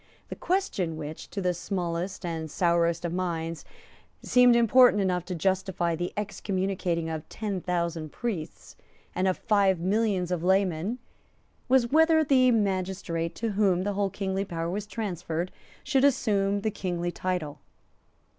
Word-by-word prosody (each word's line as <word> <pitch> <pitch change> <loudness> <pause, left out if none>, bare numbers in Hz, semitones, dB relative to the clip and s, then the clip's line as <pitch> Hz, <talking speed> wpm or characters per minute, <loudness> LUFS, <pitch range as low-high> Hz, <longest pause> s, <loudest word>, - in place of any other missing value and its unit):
The - - -5
question 270 - -1
which, 155 0 -7
to 200 - -4
this 180 -1 0
smallest 180 0 -3
and 160 -2 -4
sourest 170 0 +1
of 170 - -2
minds, 165 -3 -3 0.6
seemed 250 -1 +5
important 235 -1 +6
enough 180 -3 0
to 185 - -4
justify 185 -1 0
the 175 +2 -3
excommunicating 190 -4 -2
of 160 -1 -5
ten 205 -4 -4
thousand 170 -3 -2
priests 195 -10 -5 0.4
and 185 - 0
of 185 - +1
five 200 -4 +2
millions 190 -1 0
of 175 -2 -1
laymen 190 +3 +1 0.7
was, 250 -2 +3
whether 320 +1 +5
the 260 -3 +4
magistrate 185 -6 -1
to 230 -1 -2
whom 195 -3 +2
the 205 +1 -1
whole 200 0 0
kingly 195 0 -2
power 170 -3 -4
was 205 +2 -4
transferred 180 -5 -3 0.3
should 270 -1 +2
assume 205 -7 +2
the 220 - -1
kingly 175 -3 -3
title. 180 -5 -3
185 Hz, 145 wpm, -27 LUFS, 170-210 Hz, 0.7 s, important